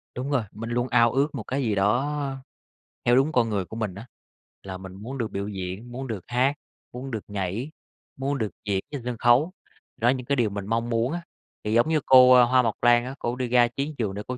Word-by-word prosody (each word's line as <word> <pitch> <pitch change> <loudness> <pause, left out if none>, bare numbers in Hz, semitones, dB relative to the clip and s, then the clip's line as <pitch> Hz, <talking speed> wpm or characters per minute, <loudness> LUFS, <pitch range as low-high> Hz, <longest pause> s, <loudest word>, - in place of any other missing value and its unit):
Đúng 130 +4 -4
rồi, 130 -5 +2
mình 115 +2 -7
luôn 120 +1 0
ao 120 -1 +4
ước 140 +4 0
một 120 - -4
cái 135 +6 -2
gì 110 -4 0
đó 135 +8 0 0.7
theo 120 +1 +5
đúng 135 +4 +3
con 120 -4 +2
người 100 -4 -1
của 110 - -10
mình 110 -5 -3
á, 100 +4 -9 0.6
là 95 -1 -6
mình 95 0 -10
muốn 115 +8 -7
được 115 -4 -3
biểu 100 +1 -3
diễn, 95 +3 -6
muốn 130 +2 -5
được 110 -4 -4
hát, 125 +3 +2 0.4
muốn 130 +2 -7
được 110 -3 -4
nhảy, 100 - -3 0.5
muốn 135 +1 -1
được 110 -4 -1 0.2
diễn 100 -2 0
trên 145 -3 -5
sân 125 -1 -3
khấu. 125 +9 +4 0.5
Đó 115 - +1
là - - +6
những 130 -2 -3
cái 140 - +1
điều 120 -5 +1
mình 100 -1 -5
mong 115 +2 -1
muốn 115 +2 0
á, 175 - -3 0.4
thì 105 - -1
giống 120 +6 +3
như 160 -1 +3
cô, 130 -1 +8
ơ, 125 -1 +8
Hoa 130 +1 +4
Mộc 115 -3 -1
Lan 120 0 +4
á, 130 +2 -6
cổ 120 +1 -2
đi 125 -1 -2
ra 120 0 +4
chiến 140 +5 -4
trường 105 -5 -1
để 105 - -5
cô 125 0 -4
120 Hz, 250 wpm, -25 LUFS, 110-130 Hz, 0.7 s, cô